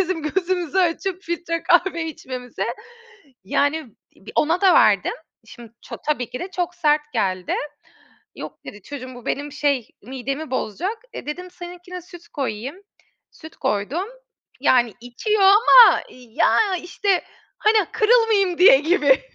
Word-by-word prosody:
bizim 370 -3 -1
gözümüzü 355 +2 -1
açıp 370 +1 0
filtre 335 -1 -3
kahve 350 -1 +2
içmemize. 255 -8 -6 0.8
Yani 285 +3 -1 0.2
b - - -13
ona 330 +4 +2
da 385 -2 +5
verdim. - - +4 0.3
Şimdi 235 -2 -13
ça - - -9
tabii 275 -6 -1
ki 250 - -6
de 370 - -6
çok 355 -1 -3
sert 305 -3 +2
geldi. 185 -5 -1 0.8
Yok - - -9
dedi, 205 -1 -10
çocuğum 255 -1 -8
bu 245 -1 -13
benim 290 +1 -3
şey 285 -5 -1
midemi 265 +5 -5
bozacak. 350 - -3
E, - - -8
dedim 360 +5 -6
seninkine 355 0 -10
süt 345 0 -14
koyayım. 265 0 -4 0.5
Süt 315 0 -14
koydum. 255 - -2 0.5
Yani 240 -4 +3
içiyor 390 - -1
ama 415 +1 +7
ya 280 - +1
işte 365 +1 -1 0.3
hani 430 +1 +3
kırılmayayım 435 -5 +3
diye 355 -7 +8
gibi. 295 -4 +3
325 Hz, 135 wpm, -21 LUFS, 260-365 Hz, 0.8 s, diye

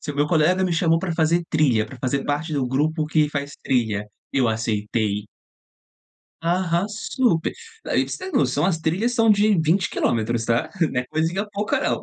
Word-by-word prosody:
Se - - -5
o - - -11
meu 145 +1 +2
colega 175 +4 +3
me 180 - 0
chamou 165 0 +2
para 175 -1 -3
fazer 170 +1 +2
trilha, 130 -9 +3
para 130 0 -12
fazer 135 +2 -1
parte 150 +3 -2
do 135 -3 0
grupo 155 +5 0
que 155 -1 +2
faz 140 -1 -3
trilha, 110 -5 0 0.3
eu 130 -4 +2
aceitei. 105 -2 -1 1.2
Aham 175 +1 +1
super, 215 -3 0 0.3
ai - - +1
para - - -11
você - - -4
ter - - -15
noção 160 - +1
as 175 -3 +1
trilhas 185 +10 0
são 225 -2 +2
de 210 -1 +4
20 165 +4 +2
quilômetros 115 0 0
tá, 120 +8 0 0.2
não 125 - -1
é 125 - -7
coisinha 165 +7 -1
pouca 205 +1 -1
não. - - 0
155 Hz, 190 wpm, -23 LUFS, 125-175 Hz, 1.2 s, de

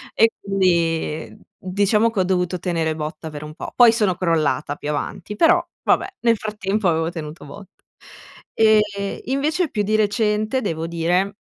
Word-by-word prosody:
E 225 +1 +5
quindi 170 -5 0 0.2
diciamo 200 +4 +1
che 220 -4 -3
ho - - +4
dovuto 180 -1 -1
tenere 165 -3 -1
botta 155 +1 -6
per 150 0 -8
un 150 0 -8
po'. - - -7
Poi 240 -2 +7
sono 210 -6 +1
crollata 155 -5 0
più 145 - -6
avanti, 150 +7 -4
però 345 +6 +4 0.2
vabbè, 385 - +1
nel 230 -2 +3
frattempo 210 -1 -2
avevo 165 0 +1
tenuto 155 -2 -8
botta. 195 +6 -13 0.7
E 210 -2 +2
invece 300 +5 0
più 210 -2 -1
di 215 +2 0
recente 215 +3 +1
devo 165 -3 -3
dire 180 +4 0
195 Hz, 155 wpm, -21 LUFS, 165-215 Hz, 0.7 s, Poi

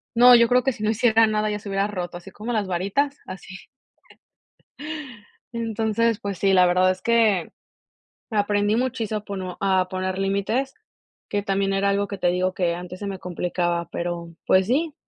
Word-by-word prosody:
no, 245 +1 +8
yo 235 0 +6
creo 250 0 +4
que 265 - +2
si 215 - -8
no 215 - +1
hiciera 225 0 +4
nada, 215 0 0
ya 210 - -3
se 200 - -9
hubiera 195 +1 0
roto, 180 -4 -5
así 175 - -12
como 220 +3 -6
las 215 -4 0
varitas, 200 +11 -1
así. 185 0 -9 2.0
Entonces, 225 -1 0
pues 200 -4 -4
sí, 195 +1 +2
la 185 -1 +6
verdad 180 +1 +3
es 185 0 -3
que 220 -7 +2 0.8
aprendí 205 0 +1
muchísimo 230 -3 -1
a - - -14
pono 190 -3 -5
a 190 -2 +2
poner 185 0 -3
límites. 200 +8 -1 0.6
Que 205 - -1
también 195 0 0
era 195 +1 +1
algo 200 0 0
que 200 - -6
te - - +1
digo 180 +1 +1
que 175 -2 0
antes 180 +1 -8
se 205 - -5
me 195 -1 -4
complicaba, 175 -1 -2
pero, 170 -1 -4
pues 185 0 +3
sí, 300 +6 0
200 Hz, 185 wpm, -23 LUFS, 185-225 Hz, 2.0 s, no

